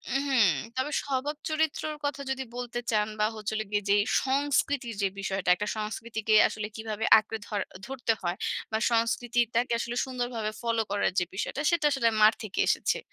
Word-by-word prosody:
উ - - +5
হুম, 245 -7 +5 0.3
তবে 260 +3 -1
স্বভাব 280 +2 -2
চরিত্রর 310 0 -1
কথা 285 -1 -2
যদি 265 0 -2
বলতে 240 -1 -4
চান 210 -1 +2
বা 210 - +4
হচ্ছে 215 0 -4
হলো 215 0 -2
গিয়ে 205 -1 0
যে 200 - +6 0.3
সংস্কৃতির 275 -3 0
যে 195 - +3
বিষয়টা, 195 -2 -2
একটা 210 +3 -4
সংস্কৃতিকে 220 +1 -2 0.2
আসলে 210 -1 -4
কীভাবে 220 0 -3
আঁকড়ে 220 +1 -6
ধর 205 -2 -2 0.3
ধরতে 245 -4 0
হয়? 175 +1 -2 0.3
বা 220 - +1
সংস্কৃতিটাকে 235 +1 +1
আসলে 240 0 -3
সুন্দরভাবে 245 -4 -3
ফলো 230 -1 +1
করার 205 - +1
যে 175 - 0
বিষয়টা 215 +8 -3
সেটা 325 -3 +1
আসলে 235 -4 +3
মার 215 +1 +8
থেকে 205 - -5
এসেছে। - - +1
230 Hz, 175 wpm, -28 LUFS, 215-260 Hz, 0.3 s, মার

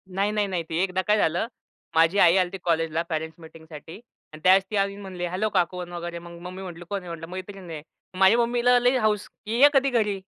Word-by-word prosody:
नाही, 200 +2 +1
नाही, 210 -1 0
नाही. 180 -3 -2
ती 160 - -2
एकदा 185 -1 -1
काय 210 0 +4
झालं, 175 +2 +1 0.5
माझी 165 +4 +4
आई 170 -1 +6
आली 185 -1 +3
होती 195 - -7
कॉलेजला 165 -1 0
पॅरेन्ट्स 160 0 -4
मीटिंगसाठी 160 -1 -12 0.4
आणि 155 - -10
त्यावेळेस 190 +1 +6
ती - - -2
येऊन 200 0 -1
म्हणली, 185 -2 -5
हॅलो 185 +5 -1
काकू 180 -2 0
अन् 175 -1 -7
वगैरे 170 0 -5
मग, 170 0 -12
मग 170 - -11
मम्मी 185 +1 -9
म्हणली 175 -2 -8
कोण 200 -1 -2
आहे? 180 - -10
म्हटलं 165 -1 -7
मैत्रीण 185 0 -8
आहे. 155 -2 -6 0.4
माझ्या 195 +4 +6
मम्मीला 240 +1 +3
लई 245 +2 +2
हौस 215 -3 0 0.2
की 225 +3 -2
ये 290 - +9
कधी 275 0 +3
घरी. 210 -5 0
185 Hz, 235 wpm, -25 LUFS, 170-210 Hz, 0.5 s, ये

